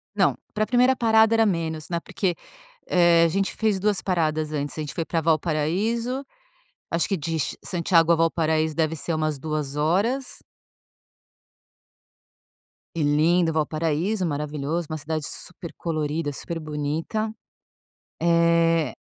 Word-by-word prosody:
Não, - - +3 0.2
para 215 0 +1
a - - -9
primeira 250 +3 +4
parada 225 -2 +4
era 225 -1 +4
menos, 160 -4 -2
né, 170 -1 -1
porque, 190 -2 -2 0.5
eh, 170 -2 +5
a - - +3
gente 195 +4 -1
fez 215 -3 +1
2 205 -1 +1
paradas 155 -4 0
antes. 145 0 -3
A - - -1
gente 150 -2 -5
foi 165 - -2
para 165 0 -1
Valparaíso. 180 - 0 0.7
Acho 170 0 +1
que 195 - 0
de 165 +1 -3
ch - - -2
Santiago 170 -2 +2
a - - +6
Valparaíso 160 -1 +1
deve 160 0 0
ser 165 +2 -3
umas 155 -2 -1
2 150 -2 -3
horas. 200 - 0 2.6
E 165 - -1
lindo. 160 +3 +3
Valparaíso 165 +5 0
maravilhoso, 150 +2 -2
uma 155 - -3
cidade 155 +1 -3
super 170 -3 -6
colorida, 155 -2 -2
super 165 +4 -5
bonita, 155 +9 -3 0.9
eh 170 -4 +3
165 Hz, 140 wpm, -24 LUFS, 155-185 Hz, 2.6 s, a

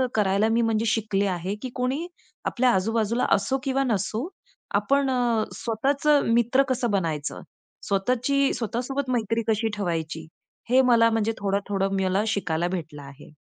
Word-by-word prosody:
करायला 200 +1 +2
मी 230 +1 +2
म्हणजे 225 0 +1
शिकले 210 -3 0
आहे, 185 +2 -2
की 255 - -4
कोणी 260 +7 -1 0.4
आपल्या 255 +1 +2
आजूबाजूला 225 +4 0
असो 230 +7 -1
किंवा 270 0 +1
नसो, 220 - -1 0.5
आपण 275 -1 +2
अ, 240 -3 +1 0.2
स्वतःचं 280 +6 +2
मित्र 240 +3 +3
कसं 240 -3 0
बनायचं, 160 -7 -2 0.5
स्वतःची 255 +7 +1
स्वतःसोबत 255 +4 -3
मैत्री 225 +1 -1
कशी 220 +1 +1
ठेवायची 160 -4 -3 0.4
हे 260 +1 +5
मला 230 -2 +5
म्हणजे 225 0 +1
थोडं-थोडं 195 0 -1
मला 190 +3 +1
शिकायला 175 -5 -1
भेटलं 160 -5 -5
आहे. 140 +2 -13
225 Hz, 140 wpm, -25 LUFS, 195-250 Hz, 0.5 s, हे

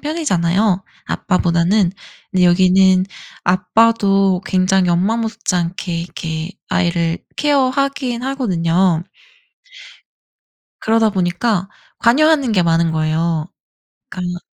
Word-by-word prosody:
편이잖아요 200 - 0 0.2
아빠보다는. 180 +1 +1 0.4
근데 185 -1 +2
여기는 185 +1 +4 0.4
아빠도 195 0 +2
굉장히 185 0 +1
엄마 185 +6 +1
못지않게 180 -6 -2
이렇게 165 -1 -5 0.2
아이를 170 -2 0 0.2
케어하긴 275 -3 0
하거든요. 185 - 0 1.8
그러다 225 0 +2
보니까 185 +1 -1 0.3
관여하는 285 +2 +3
게 185 -4 +3
많은 165 0 +2
거예요. 160 0 -1 0.6
그러니까 180 -1 -5
185 Hz, 250 characters per minute, -17 LUFS, 170-225 Hz, 1.8 s, 여기는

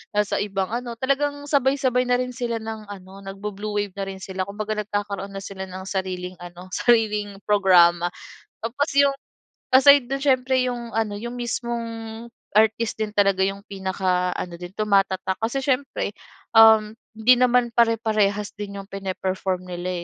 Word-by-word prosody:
nasa 210 -1 +1
ibang 195 -2 -2
ano, 240 0 -4
talagang 275 +2 +1 0.2
sabay-sabay 265 -2 +2
na 245 0 +3
rin 250 0 -2
sila 235 -1 -2
ng 220 -1 -7
ano 190 0 -11
nag-bu-blue 205 +2 -6
wave 200 -2 -6
na 195 - -2
rin 190 - -8
sila. 190 -1 -3
Kumbaga, 215 +2 -4
nagkakaroon 205 -1 -4
na 195 - -5
sila 195 -1 -7
ng 185 +1 -7
sariling 185 -1 -3
ano, 175 +1 -10
sariling 210 -4 +1
programa 175 -4 +5 0.5
tapos 255 +7 -1
'yong 280 -1 +5 0.6
aside 280 0 +8
do'n 275 - 0
siyempre, 260 -1 +2
'yong 240 -2 -4
ano, 220 -2 0
'yong 235 +2 -5
mismong 235 -1 -3 0.7
artist 220 +1 +2
din 215 -1 -2
talaga 195 -2 +3
'yong 195 +1 -4
pinaka-ano 185 -2 -2
din 180 +1 -8
tumatatak 195 -3 +1
kasi 235 +5 -1
siyempre, 265 -5 -1 0.5
um, 220 -1 +7 0.3
hindi 225 +3 +6
naman 250 -1 +3
pare-parehas 215 -3 +2
din 205 -1 -6
'yong 195 - -10
pine-perform 190 -1 -3
nila 175 0 -4
210 Hz, 150 wpm, -23 LUFS, 190-235 Hz, 0.7 s, aside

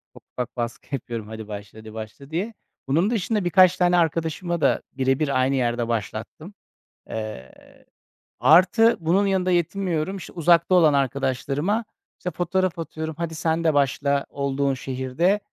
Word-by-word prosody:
ufak - - -15
ufak 125 0 -4
baskı 120 +4 -4
yapıyorum, 115 -4 -6
"Hadi 110 -1 -8
başla, 105 +1 -8
hadi 110 0 -11
başla." 110 +5 -9
diye. 195 +8 -2 0.3
Bunun 165 +10 +2
dışında 210 -3 -1
birkaç 185 0 +5
tane 180 0 +3
arkadaşımı 165 +1 0
da 140 - +3
bire 135 0 +1
bir 140 -4 +1
aynı 130 +2 +2
yerde 120 -2 0
başlattım. 115 - -4 0.6
Eee, 110 - -6 0.9
artı 185 +8 +5
bunun 175 +5 +2
yanında 185 -1 +1
yetinmiyorum. 175 0 0
İşte, 185 - -10
uzakta 170 +2 +4
olan 160 -4 +5
arkadaşlarıma, 140 - 0 0.3
işte, 180 - -3
fotoğraf 180 +1 -1
atıyorum, 160 0 -5
"Hadi, 165 -1 -4
sen 160 +1 0
de 160 -2 +3
başla 140 0 +1
olduğun 140 0 -1
şehirde, 130 +9 0
155 Hz, 145 wpm, -24 LUFS, 130-175 Hz, 0.9 s, birkaç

